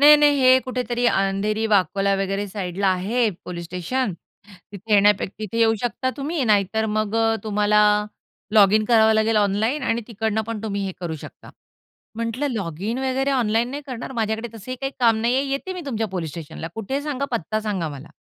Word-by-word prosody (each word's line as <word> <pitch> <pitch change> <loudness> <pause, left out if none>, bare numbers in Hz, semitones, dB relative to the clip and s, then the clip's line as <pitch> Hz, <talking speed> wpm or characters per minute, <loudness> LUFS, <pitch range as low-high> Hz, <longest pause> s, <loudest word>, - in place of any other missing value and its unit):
नाही. 300 +1 +9
नाही. 290 -1 +4
हे 255 0 +7
कुठेतरी 245 -1 -1
अंधेरी, 205 +1 +1
वाकोला 200 -1 +2
वगैरे 195 +1 -2
साइडला 195 -1 -2
आहे 220 +6 +1 0.2
पोलिस 170 -1 -6
स्टेशन, 185 +7 -2 0.6
तिथे 210 +2 -6
येण्यापेक्षा 205 -1 +3
तिथे 215 +1 -4
येऊ 225 -1 +4
शकता 255 +2 -1
तुम्ही? 295 +2 -2
नाहीतर 215 0 +2
मग 215 0 0 0.3
तुम्हाला 210 0 +2 0.7
लॉगिन 215 0 +6
करावं 220 -2 +5
लागेल 220 0 +2
ऑनलाईन 210 +7 +1
आणि 235 -2 0
तिकडनं 220 -1 -1
पण 220 -1 -5
तुम्ही 200 -2 -2
हे 190 - -4
करू 165 -3 -4
शकता. - - -12 0.7
म्हटलं 230 +5 -2
"लॉगिन 200 +1 -3
वगैरे 265 +1 0
ऑनलाईन 235 -2 +1
नाही 285 +2 -5
करणार, 255 -1 -6
माझ्याकडे 225 -1 -2
तसंही 225 +4 -7
काही 270 0 -3
काम 230 -2 +4
नाहीये 245 +4 +2
येते 275 +7 -3
मी 365 - -6
तुमच्या 225 -5 -1
पोलीस 175 -4 -4
स्टेशनला 165 +1 -7
कुठे 225 +4 -4
आहे 280 - -1
सांगा." 280 -2 -2
पत्ता 215 0 -1
सांगा 200 -6 -2
मला. 145 0 -9
220 Hz, 175 wpm, -22 LUFS, 200-250 Hz, 0.7 s, नाही